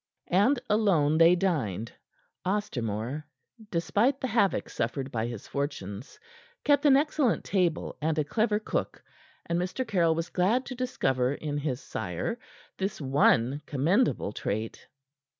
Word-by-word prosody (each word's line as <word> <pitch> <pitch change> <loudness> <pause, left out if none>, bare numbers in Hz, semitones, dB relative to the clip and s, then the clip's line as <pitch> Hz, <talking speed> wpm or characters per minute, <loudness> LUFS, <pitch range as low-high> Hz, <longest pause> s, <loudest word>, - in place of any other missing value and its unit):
And 220 +9 +4
alone 175 -8 +3
they 170 +2 +7
dined. 130 - -1 0.5
Ostermore, 135 - -2 0.5
despite 210 +9 +1
the - - -2
havoc 220 -4 +2
suffered 135 +4 -3
by 115 -3 -1
his 120 -4 -7
fortunes, 130 -6 -5 0.4
kept 290 0 +4
an 270 -1 +7
excellent 290 -4 +1
table 180 -5 0
and 160 +1 0
a 155 - +2
clever 215 +7 +1
cook, 215 - -3 0.4
and 170 0 0
Mr. 185 +8 -2
Caryll 170 -5 +2
was 165 +2 -3
glad 215 +8 +1
to - - -6
discover 135 - 0
in 145 -1 -3
his 140 -3 -2
sire 100 - -4 0.4
this 195 +1 -2
one 135 -1 +3
commendable 165 - +1
trait. 110 +2 -4
165 Hz, 135 wpm, -28 LUFS, 130-210 Hz, 0.5 s, they